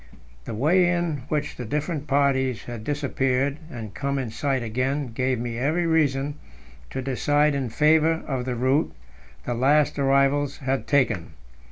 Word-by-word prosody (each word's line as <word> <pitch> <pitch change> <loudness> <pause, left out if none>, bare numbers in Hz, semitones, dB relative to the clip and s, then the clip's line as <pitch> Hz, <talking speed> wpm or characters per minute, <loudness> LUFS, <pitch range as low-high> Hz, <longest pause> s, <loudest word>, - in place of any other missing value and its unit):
The - - -5
way 175 - +3
in 175 -3 0
which 150 -1 -2
the 125 - -5
different 150 +4 -3
parties 130 -4 +1
had 120 -3 -7
disappeared 140 0 0
and 110 -8 -7
come 140 +6 -2
in 125 -5 -3
sight 135 0 -1
again 130 +4 -1
gave 130 +1 0
me 120 0 -4
every 155 +7 +1
reason 145 -3 +1 0.5
to 130 - -4
decide 145 +3 +2
in 135 -3 -2
favour 160 +4 +3
of 130 -3 -3
the 125 -1 -2
route 130 +6 +1 0.5
the 120 - -1
last 145 +5 +2
arrivals 140 +1 +2
had 135 -1 -2
taken. 120 - +1
140 Hz, 155 wpm, -24 LUFS, 125-150 Hz, 0.5 s, way